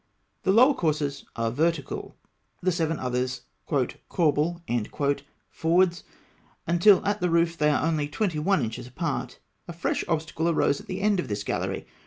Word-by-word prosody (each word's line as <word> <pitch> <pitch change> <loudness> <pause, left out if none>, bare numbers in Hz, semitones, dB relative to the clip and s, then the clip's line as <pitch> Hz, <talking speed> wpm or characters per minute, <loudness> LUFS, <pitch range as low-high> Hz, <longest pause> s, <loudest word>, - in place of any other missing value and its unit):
The - - +2
lower 250 +7 +6
courses 150 - -1
are 115 -1 -1
vertical; 160 +2 -1 0.4
the 185 - +1
seven 165 -2 0
others 125 0 -2 0.3
"corbel" 155 +3 0 0.9
forwards, 170 +1 +2 0.6
until 175 +4 +5
at 205 -1 0
the 180 - +2
roof 170 0 +2
they 150 -2 +2
are 150 - +1
only 155 -3 0
twenty 175 0 -1
one 195 +5 +2
inches 115 +1 -5
apart. 130 -3 -3 0.3
A 170 - -6
fresh 170 - -1
obstacle 160 0 -1
arose 145 -3 +2
at - - -17
the 185 +1 -4
end 205 -2 +2
of - - -2
this 105 -1 -3
gallery. - - -2
165 Hz, 155 wpm, -26 LUFS, 145-175 Hz, 0.9 s, lower